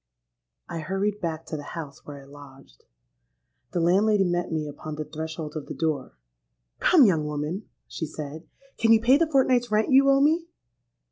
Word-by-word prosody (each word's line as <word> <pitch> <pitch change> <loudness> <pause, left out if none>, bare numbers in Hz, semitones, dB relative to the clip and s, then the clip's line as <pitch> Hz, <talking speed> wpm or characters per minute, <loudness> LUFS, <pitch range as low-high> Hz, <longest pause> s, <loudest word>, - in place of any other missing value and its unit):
"I 170 -1 -5
hurried 195 +5 -2
back 165 -1 -3
to - - -5
the - - -6 0.2
house 145 -4 -8
where 140 -2 -9
I - - -16
lodged. 135 - -16 0.9
The 175 - -1
landlady 195 +4 +3
met 175 -1 -1
me 155 -2 -2
upon 150 +1 -7
the 155 0 -5
threshold 160 0 -6
of 155 - -6
the - - -6
door. 155 - -2 0.6
'Come, 330 -7 +6
young 165 -7 +2
woman,' 150 +7 -4 0.2
she 160 - -5
said, 150 +2 -8 0.3
'can 225 0 +5
you 225 - +5
pay 250 +5 +5
the 330 0 +1
fortnight's 255 -3 +3
rent 215 +4 +1
you 275 +1 +6
owe 275 0 +5
me?' 320 +4 +2
170 Hz, 180 wpm, -25 LUFS, 150-220 Hz, 0.9 s, Come